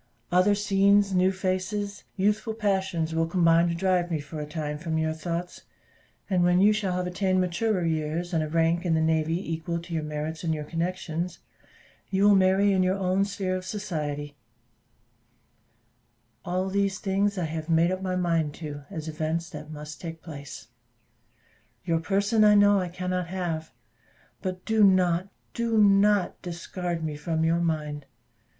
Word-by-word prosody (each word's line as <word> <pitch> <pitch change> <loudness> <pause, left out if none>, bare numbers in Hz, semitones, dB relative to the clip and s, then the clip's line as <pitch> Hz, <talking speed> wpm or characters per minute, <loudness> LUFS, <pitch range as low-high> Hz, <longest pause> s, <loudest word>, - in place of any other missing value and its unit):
Other 185 +3 +4
scenes, 200 0 +3
new 185 +1 +3
faces, 190 +2 -3
youthful 210 +3 0
passions 190 -6 0
will 165 0 +1
combine 170 -1 +4
to 170 - -1
drive 180 -1 +1
me 160 -3 -1
for 145 +2 -7
a 150 - -5
time 150 -1 -4
from 160 -1 -2
your 160 0 0
thoughts, 170 +2 -5 0.7
and 185 -3 +2
when 175 +1 +4
you 205 +2 +6
shall 205 -3 -1
have 180 0 -1
attained 185 +1 0
maturer 185 +1 0
years, 160 +2 -2
and 165 - +2
a 155 - -4
rank 165 +2 +2
in 170 -3 +1
the - - +2
navy 160 0 +1 0.2
equal 170 +1 -3
to 170 0 -9
your 160 - 0
merits 150 +2 -4
and 160 -2 0
your 150 - -4
connections, 170 +1 -3 0.7
you 195 0 +1
will 205 0 +7
marry 195 +1 +4
in 190 - +3
your 185 +1 +2
own 190 0 +1
sphere 190 -2 -2
of 185 - -4
society; 150 -8 -4 2.1
all 185 +2 -1
these 195 0 0
things 200 0 0
I 180 - 0
have 160 +1 -5
made 165 +2 +3
up 185 0 -3
my 185 -1 -2
mind 165 -4 0
to, 145 -3 -7
as 160 0 -6
events 160 +2 -3
that 150 -1 -8
must 150 0 -8
take 165 -2 -7
place. 145 -4 -9 1.2
Your 165 -2 +1
person 200 +5 +2
I 210 0 +6
know 205 0 +5
I 180 - -2
cannot 180 0 -3
have 170 -3 -3 0.7
but 185 -1 -5
do 220 -1 +3
not, 185 -1 +3 0.2
do 230 -1 0
not 205 -1 +4
discard 175 -1 -4
me 155 -2 -3
from 160 +2 -2
your 165 +1 +2
mind. 150 -4 -2
175 Hz, 170 wpm, -26 LUFS, 160-190 Hz, 2.1 s, will